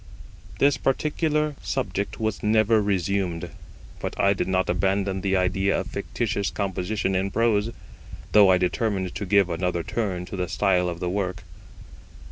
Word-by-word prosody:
This 140 0 +3
particular 150 +2 0
subject 100 +1 -3
was 110 -3 -2
never 110 +1 +3
resumed, 95 -3 -1 0.5
but - - -5
I 100 - +4
did 100 - -2
not 95 0 +1
abandon 95 +1 0
the 95 0 +1
idea 95 +2 +1
of - - -6
fictitious 105 -3 -2
composition 95 0 -2
in 95 +1 0
prose, 110 0 +1 0.6
though 105 -2 +7
I 95 - +6
determined 95 0 -1
to 100 - -4
give 100 -1 +4
another 85 0 -1
turn 100 -5 -2
to 90 - -7
the 90 -1 -2
style 90 -3 +2
of 85 0 -6
the 90 - -1
work. 90 -2 -2
100 Hz, 150 wpm, -25 LUFS, 90-105 Hz, 0.6 s, though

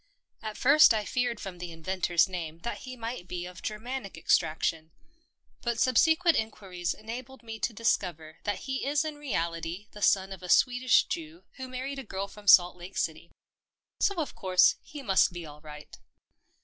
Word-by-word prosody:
At 215 -1 -6
first 280 -2 +7
I 210 -1 -1
feared 245 -2 -1
from 185 -3 -7
the 175 -1 -6
inventor's 175 +1 +1
name 170 -3 -6
that 235 - -4
he 255 0 -9
might 230 -5 -6
be 180 -1 -4
of 180 -1 -10
Germanic 220 -2 -5
extraction, 160 0 +1 0.7
but 235 -1 -1
subsequent 320 +8 +4
inquiries 190 -5 -3
enabled 245 +4 -8
me 225 -1 -7
to 235 - 0
discover 175 -8 -1
that 205 -2 -2
he 265 0 -3
is 290 +2 +1
in 305 -1 -5
reality 170 - -3
the 210 - -11
son 195 -1 +3
of 190 -2 -8
a 180 - -8
Swedish 250 +3 +4
Jew 330 0 -6
who 260 -1 -6
married 260 +2 -5
a - - -6
girl 195 -3 -4
from 205 +1 -14
Salt 180 -1 +7
Lake 180 +2 -10
City. 160 +1 -2 0.7
So, 400 - +2
of 320 -5 -3
course, 185 -2 +4
he 290 -2 -10
must 190 -5 +3
be 175 -1 -6
all 150 0 -12
right. 150 -1 -11
205 Hz, 175 wpm, -29 LUFS, 175-255 Hz, 0.7 s, first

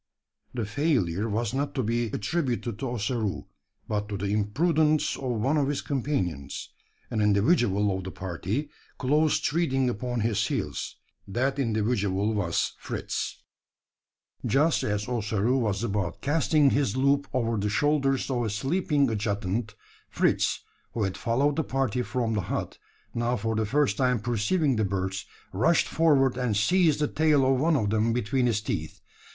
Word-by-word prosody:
The 115 -3 -1
failure 110 - 0
was 115 +2 -1
not 140 +1 -2
to 130 - 0
be 115 +2 0
attributed 120 - -2
to 135 - -2
Ossaroo; 115 -3 -2 0.4
but 105 0 -2
to 100 - -3
the 100 +1 -2
imprudence 155 - +2
of 125 -4 -3
one 135 +8 +1
of 140 -2 +2
his 145 0 -2
companions 95 - -2 0.4
an 110 - 0
individual 105 - +3
of 95 - -4
the - - -4
party 95 - -4 0.3
close 150 +3 +2
treading 135 -6 +1
upon 120 +2 -3
his 105 -2 +1
heels. - - -3 0.3
That 130 +7 -1
individual 105 -4 0
was 95 -6 0
Fritz! - - -4 1.0
Just 150 +4 +2
as 105 0 -1
Ossaroo 115 +1 0
was 105 -3 -1
about 100 -6 -2
casting 150 -1 +3
his 135 -5 +1
loop 140 +1 +2
over 115 -3 0
the 105 +1 -1
shoulders 135 +3 +1
of 120 -2 0
a 110 - -1
sleeping 140 - +1
adjutant, 105 0 -2 0.3
Fritz - - +1 0.3
who 110 - -1
had 95 -1 -1
followed 135 +5 +1
the 160 - +2
party 130 -4 -1
from 120 -2 -1
the 105 - 0
hut - - -4 0.3
now 120 +1 0
for 110 +2 -2
the 110 -1 0
first 145 +4 +1
time 125 -2 +2
perceiving 120 - +1
the 110 - +2
birds, 95 -1 -2 0.3
rushed 160 - +3
forward 140 -6 +3
and 125 -5 0
seized 160 - +3
the 150 - +3
tail 150 -3 +3
of 130 0 +2
one 165 +1 +3
of 105 -7 +1
them 110 +1 +2
between 125 +2 +1
his 110 -3 +1
teeth. 85 -7 -4
120 Hz, 155 wpm, -27 LUFS, 105-140 Hz, 1.0 s, individual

